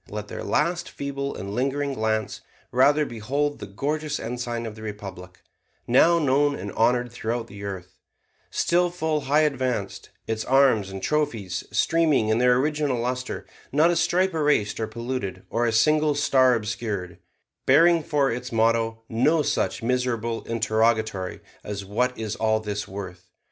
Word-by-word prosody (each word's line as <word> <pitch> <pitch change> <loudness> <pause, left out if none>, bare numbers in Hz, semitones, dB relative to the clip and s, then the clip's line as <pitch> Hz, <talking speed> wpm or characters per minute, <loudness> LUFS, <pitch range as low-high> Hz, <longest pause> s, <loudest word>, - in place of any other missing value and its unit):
Let 105 0 -6
their - - -6
last 175 0 0
feeble 140 0 -4
and 100 +2 -6
lingering 140 +3 -1
glance 110 -3 -1 0.3
rather 145 +4 +4
behold 140 +5 -2
the - - -7
gorgeous 150 +1 -2
ensign 120 0 -4
of 110 - -5
the 110 - -12
Republic, 95 -4 -8 0.4
now 165 +8 +5
known 145 -1 +2
and 100 -3 -6
honored 120 +1 +1
throughout 115 0 -3
the 100 -3 -11
earth, 95 -3 -7 0.5
still 175 +1 +2
full 160 -3 -1
high 150 +3 +3
advanced, 130 -5 -1 0.2
its 110 -1 -2
arms 130 -7 +3
and 95 -1 -7
trophies 115 -12 -1
streaming 155 -9 +2
in 110 +1 +2
their 125 0 +5
original 150 -1 0
luster, 125 +1 -3 0.3
not 155 +5 +4
a - - +1
stripe 185 +2 +2
erased 150 -11 +1
or 110 - -1
polluted, 115 -5 -4
or 120 +1 +1
a - - +1
single 150 +6 +3
star 130 -3 +4
obscured, 105 -5 -4 0.5
bearing 165 +5 +6
for 145 -3 +1
its 125 +2 -5
motto 115 0 +1
no 150 +8 +2
such - - -1
miserable 115 -2 -1
interrogatory 110 -3 0 0.2
as 100 -1 -5
'What 125 +6 -1
is 110 -2 -3
all 110 0 +1
this 105 -1 -4
worth?' 95 -2 -8
120 Hz, 155 wpm, -25 LUFS, 110-145 Hz, 0.5 s, bearing